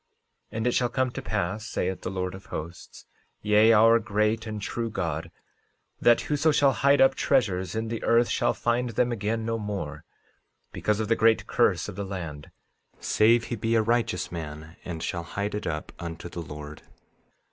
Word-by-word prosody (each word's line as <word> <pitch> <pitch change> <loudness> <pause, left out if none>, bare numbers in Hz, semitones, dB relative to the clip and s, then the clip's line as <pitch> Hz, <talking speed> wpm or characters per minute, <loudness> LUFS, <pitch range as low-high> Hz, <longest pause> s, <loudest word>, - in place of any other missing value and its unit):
13:18 110 - -6
And 110 - -1
it 125 - +3
shall 120 0 +1
come 130 0 0
to 135 - -6
pass, 110 -2 -2
saith 95 -1 -2
the - - -4
Lord 90 -1 -3
of 95 +1 -11
Hosts, 85 +3 -8 0.4
yea, 105 +2 +5
our 115 +1 +6
great 110 +1 0
and 110 -1 -4
true 115 +3 -3
God, 85 -5 -3 0.7
that 120 -1 +5
whoso 150 +1 +1
shall 145 -2 +4
hide 140 +4 +3
up 135 - +6
treasures 95 -9 0
in 110 0 -2
the 115 -1 -4
earth 120 +1 +4
shall - - +1
find 120 +1 0
them 120 +2 +1
again 110 0 -2
no 115 0 -1
more, 95 -8 -5 0.7
because 105 0 -1
of 110 - -1
the 115 - +3
great 115 0 +3
curse - - +2
of - - -7
the 100 - -4
land, 85 -7 -6 0.5
save 115 +2 +3
he 120 - -4
be 115 +1 0
a 110 - +4
righteous 115 -6 0
man 80 0 -7
and 80 -3 -5
shall 85 - -2
hide 100 +5 -4
it 105 - -3
up 75 -1 -4
unto 85 0 -6
the 85 -1 -6
Lord. 75 -1 -9
105 Hz, 190 wpm, -26 LUFS, 90-115 Hz, 0.7 s, our